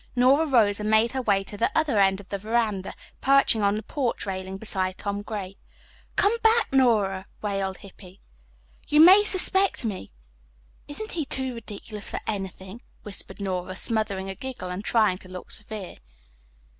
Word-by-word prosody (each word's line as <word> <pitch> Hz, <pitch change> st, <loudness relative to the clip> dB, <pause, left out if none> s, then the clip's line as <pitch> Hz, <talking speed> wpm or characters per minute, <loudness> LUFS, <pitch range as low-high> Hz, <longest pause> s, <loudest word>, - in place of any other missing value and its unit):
Nora 270 Hz, +6 st, +4 dB
rose 215 Hz, -7 st, +3 dB
and 210 Hz, 0 st, -2 dB
made 220 Hz, +2 st, +4 dB
her 265 Hz, -, -2 dB
way 200 Hz, -5 st, +1 dB
to 200 Hz, -, -10 dB
the 215 Hz, -, 0 dB
other 295 Hz, -9 st, +2 dB
end 195 Hz, 0 st, +3 dB
of 200 Hz, -, -13 dB
the 200 Hz, -, -3 dB
veranda, 215 Hz, -2 st, -1 dB, 0.3 s
perching 275 Hz, -5 st, +4 dB
on 200 Hz, 0 st, +2 dB
the 215 Hz, -, -4 dB
porch 260 Hz, -5 st, -2 dB
railing 190 Hz, -1 st, -5 dB
beside 190 Hz, -3 st, -2 dB
Tom 200 Hz, 0 st, -3 dB
Gray. 200 Hz, -2 st, -6 dB, 0.6 s
"Come 415 Hz, +3 st, +3 dB
back, 450 Hz, -6 st, +3 dB
Nora," 210 Hz, -7 st, +2 dB, 0.2 s
wailed 195 Hz, -2 st, -2 dB
Hippy. 190 Hz, -1 st, -15 dB, 0.7 s
"You 300 Hz, -, +3 dB
may 370 Hz, +6 st, +9 dB
suspect 385 Hz, -, +1 dB
me." 195 Hz, -, -5 dB, 0.8 s
"Isn't 430 Hz, +10 st, -6 dB
he 330 Hz, -, -2 dB
too 265 Hz, -2 st, -3 dB
ridiculous 210 Hz, -2 st, -7 dB
for -, -, -4 dB
anything?" 195 Hz, +1 st, -6 dB, 0.2 s
whispered 205 Hz, 0 st, -6 dB
Nora, 185 Hz, -2 st, -3 dB
smothering 215 Hz, -3 st, -1 dB
a 195 Hz, -, -4 dB
giggle 235 Hz, -4 st, -6 dB
and 185 Hz, +3 st, -5 dB
trying 215 Hz, -5 st, +2 dB
to 185 Hz, -, -15 dB
look 185 Hz, 0 st, -8 dB
severe. 210 Hz, -3 st, -2 dB
210 Hz, 165 wpm, -25 LUFS, 195-255 Hz, 0.8 s, may